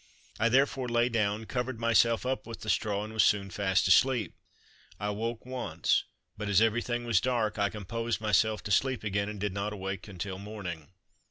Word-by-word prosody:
I 110 +2 +3
therefore 135 0 +2
lay 120 +1 +2
down, 110 -1 0
covered 125 0 -3
myself 115 0 +3
up 130 -1 -2
with 115 - -8
the 110 - 0
straw, 105 -2 0
and 110 +1 -7
was 110 - +4
soon 100 -2 +2
fast 95 0 +1
asleep. 115 0 +4 0.7
I 105 - -4
awoke 115 +3 -3
once, 130 0 0 0.3
but 105 0 -4
as 100 - +5
everything 120 +2 +1
was 115 -7 +3
dark, 115 -4 0
I 100 -1 +2
composed 115 +3 -3
myself 110 0 +2
to 105 - -5
sleep 130 +4 +2
again 100 -1 -1
and 105 -1 -6
did 100 -1 -2
not 100 +2 -2
awake 95 0 -5
until 95 -1 -5
morning. 95 -7 -7
110 Hz, 185 wpm, -29 LUFS, 100-120 Hz, 0.7 s, as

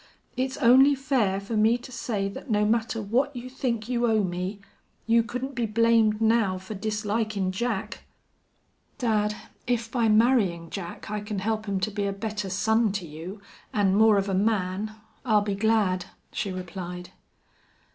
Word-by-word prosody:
It's 260 +1 -2
only 265 +3 +6
fair 255 -8 +1
fer 200 +3 -5
me 220 +3 +4
to 245 +1 -12
say 215 -5 -2
that 200 +7 -8
no 210 -1 +2
matter 225 +1 0
what 250 +7 0
you 250 +1 -7
think 235 -4 -2
you 240 -1 +1
owe 215 -2 +3
me 180 +2 -3 0.5
you 230 +1 +4
couldn't 250 +4 -5
be 240 -3 -1
blamed 225 -1 +3
now 220 -4 +2
fer 190 +3 -8
dislikin' 210 -1 -1
Jack." 215 +1 -3 0.9
"Dad, 210 -4 +1 0.3
if 230 -2 -1
by 235 -3 +2
marrying 215 -7 +3
Jack 195 +1 -6
I 210 - -1
can 210 0 -5
help 215 +2 -2
him 195 -1 0
to 215 - 0
be 200 0 -1
a 200 - -1
better 210 -1 -4
son 220 +3 +2
to 200 -4 -3
you, 165 +6 -8 0.3
and 195 -2 +3
more 220 0 +6
of 195 0 0
a 195 - -1
man, 200 0 0 0.3
I'll 215 -4 +3
be 205 -1 -2
glad," 200 -3 +1 0.2
she 200 - -3
replied. 180 -1 -6
215 Hz, 165 wpm, -26 LUFS, 195-230 Hz, 0.9 s, only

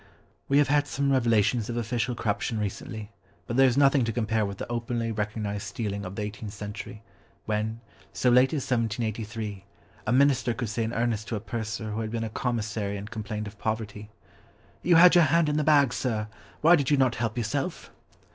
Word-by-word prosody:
We 140 - +4
have 145 -1 +5
had 145 0 +3
some 140 0 0
revelations 115 -3 +2
of 120 - -3
official 120 +1 -1
corruption 105 0 -1
recently, 105 +1 -5 0.3
but 120 - -4
there 135 +1 +6
is 125 - +1
nothing 140 -2 +5
to 115 - -1
compare 110 -2 0
with 100 -1 -6
the - - -5
openly 115 -1 -2
recognised 105 -1 -3
stealing 100 -1 -4
of 95 +1 -7
the 105 - -3
eighteenth 105 0 -6
century, 105 +2 -7 0.4
when, 110 +1 -2 0.3
so 125 - +2
late 125 +2 +5
as 150 -5 -1
1783, 110 -3 -2 0.4
a - - +2
minister 130 -2 +3
could 120 -4 -3
say 115 +1 -1
in 110 - -2
earnest 115 -2 -1
to 115 - -2
a - - -2
purser 110 -1 -4
who 110 +2 -2
had 110 - -3
been 115 0 -3
a 110 - -4
commissary 110 -4 -2
and 105 +3 -8
complained 105 -1 -4
of 105 0 -10
poverty, 110 -1 -4 0.7
"You 175 0 +4
had 175 +2 +8
your 175 -2 +6
hand 165 +2 +3
in 150 - 0
the 155 - +2
bag, 145 -5 +4
sir, 110 -4 -2 0.3
why 165 +3 +7
did 140 -5 0
you 145 - +4
not 130 -3 +3
help 115 0 -1
yourself?" 135 - -3
115 Hz, 200 wpm, -27 LUFS, 105-130 Hz, 0.7 s, had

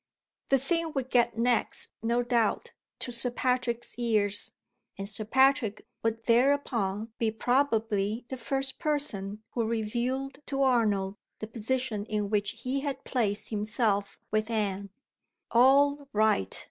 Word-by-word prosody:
The 270 - +5
thing 325 +4 -1
would 265 -1 -2
get 240 -2 +3
next, 235 0 +1
no 235 +2 +1
doubt, 235 -3 +1 0.3
to 245 - -3
Sir 240 +1 +1
Patrick's 245 -1 -1
ears; 210 -4 +1 0.4
and 195 0 -4
Sir 215 +1 -3
Patrick 260 -3 +3 0.2
would 225 0 -1
thereupon 230 -4 +1
be 225 - +2
probably 225 -3 +1
the 260 - -4
first 270 +2 -3
person 220 - -1
who 235 - 0
revealed 240 +5 -2
to 275 -1 0
Arnold 210 -6 +2 0.2
the - - -5
position 225 -1 -2
in 210 -2 -2
which 210 +2 0
he 260 +2 0
had 275 -1 -4
placed 215 -5 -1
himself 210 -2 0
with 215 +1 0
Anne. 200 -3 -1 0.6
All 280 +4 +5
right! 210 - +2
230 Hz, 135 wpm, -29 LUFS, 215-260 Hz, 0.6 s, The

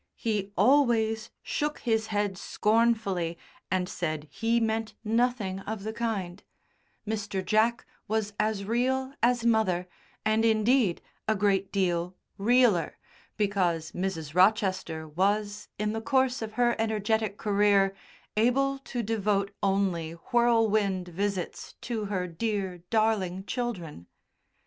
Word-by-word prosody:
he 205 -3 -2
always 225 -2 +3
shook 295 0 -2
his 220 -2 +1
head 205 -2 -1
scornfully 210 -4 +1 0.3
and 185 -1 0
said 155 -4 -3
he 230 +1 +1
meant 220 -1 -1
nothing 225 -4 0
of 205 0 -5
the 220 +1 -4
kind, 200 -6 -3 0.7
Mr. 205 -3 -3
Jack 225 +2 +2 0.2
was 215 -1 -1
as 215 -2 0
real 260 +4 0
as 240 0 +2
mother, 200 -6 +2 0.4
and, 215 +1 +2
indeed, 220 -2 +3 0.2
a 220 - +3
great 195 -1 +1
deal 180 -2 0 0.2
"realer," 230 -4 +3 0.4
because 180 -6 0
Mrs. 170 -5 -3
Rochester 185 -4 +2
was, 205 +5 0
in 210 +1 -1
the 225 - -3
course 260 0 +1
of 220 -1 -5
her 240 0 +2
energetic 220 -1 0
career, 200 -2 +3 0.4
able 270 +5 +2
to 245 -3 -4
devote 205 -2 0
only 190 -5 0 0.2
"whirlwind" 220 -6 +2
visits 195 +1 -3
to 225 -3 -3
her 190 -3 -2
"dear, 190 0 -3
darling" 205 -4 +1
children. 190 - -4
210 Hz, 120 wpm, -28 LUFS, 190-225 Hz, 0.7 s, always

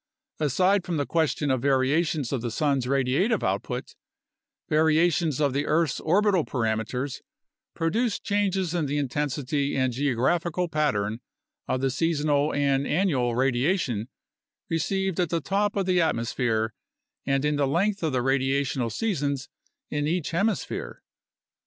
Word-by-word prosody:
Aside 180 +7 +2
from 175 -2 -2
the 145 - 0
question 150 0 0
of 130 -2 0
variations 140 +1 +1
of 130 - -1
the 120 - -2
sun's 135 +1 0
radiative 140 - +1
output, - - -2 0.7
variations 160 -1 +2
of 145 -3 +2
the 145 +2 -1
earth's 155 -3 +1
orbital 190 +1 +2
parameters 125 +2 -2 0.5
produce 205 +8 0
changes 195 -4 0
in 165 -4 0
the 145 +2 -1
intensity 145 0 -1
and 130 -2 +1
geographical 145 +7 0
pattern 120 - 0 0.5
of 130 - -1
the 135 -1 +1
seasonal 150 -1 +1
and 140 -1 +1
annual 145 -9 +1
radiation 130 - 0 0.6
received 190 +3 -1
at 175 -3 +1
the 170 - 0
top 200 +6 0
of 195 -2 0
the 180 -1 +3
atmosphere 115 -6 0 0.5
and 135 +1 +1
in 150 0 +1
the 140 -1 +2
length 195 +7 +1
of 160 -2 0
the 125 -2 0
radiational 135 -2 0
seasons 145 - -2 0.4
in 145 0 -1
each 170 -1 -1
hemisphere. 200 +6 -2
145 Hz, 135 wpm, -26 LUFS, 130-170 Hz, 0.7 s, the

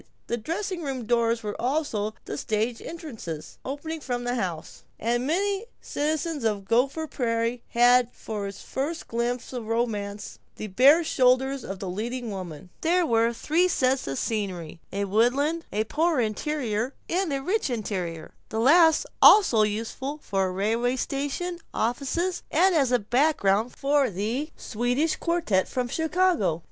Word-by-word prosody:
The 235 - -1
dressing 345 - -3
room 265 -6 -4
doors 230 0 +1
were 210 -1 -3
also 240 -6 -1
the - - -5
stage 220 +2 -1
entrances, 235 - -7
opening 305 +4 -5
from 245 -4 -3
the 245 0 -1
house, 180 -9 -4 0.2
and 240 +3 0
many 390 +5 +1
a 440 - -12
citizen 305 -1 -2
of 210 -3 0
Gopher 265 +9 +1
Prairie 235 -3 -1
had 245 0 +4
for 210 -2 -5
his 195 - -9
first 305 +5 -4
glimpse 240 +2 -2
of 240 -3 -5
romance 210 -3 -2 0.2
the - - -6
bare 265 - +5
shoulders 265 -1 +2
of 195 - -5
the 190 - -6
leading 230 +5 -4
woman. 180 -3 -7
There 345 +2 +3
were 230 -3 +3
three 315 +9 +1
sets 260 - +1
of 135 0 -3
scenery: 180 - -3
a 200 +1 -1
woodland, 265 - +1
a 210 +1 +1
Poor 315 +6 +1
Interior, 235 +1 -1
and 360 -1 0
a 275 - 0
Rich 370 +4 0
Interior, 185 -8 -4 0.2
the 220 - -2
last 320 +6 +5 0.2
also 360 - +7
useful 230 +7 -2
for 195 -1 0
railway 225 +6 0
stations, 290 +7 -3
offices, 280 +10 -1
and 370 +4 +4
as 275 -6 +2
a 250 - +5
background 235 -2 +1
for 280 -1 +2
the 220 - -2
Swedish 245 +8 0
Quartette 335 - +1
from 250 -1 -2
Chicago. 320 - +1
245 Hz, 150 wpm, -26 LUFS, 215-300 Hz, 0.2 s, also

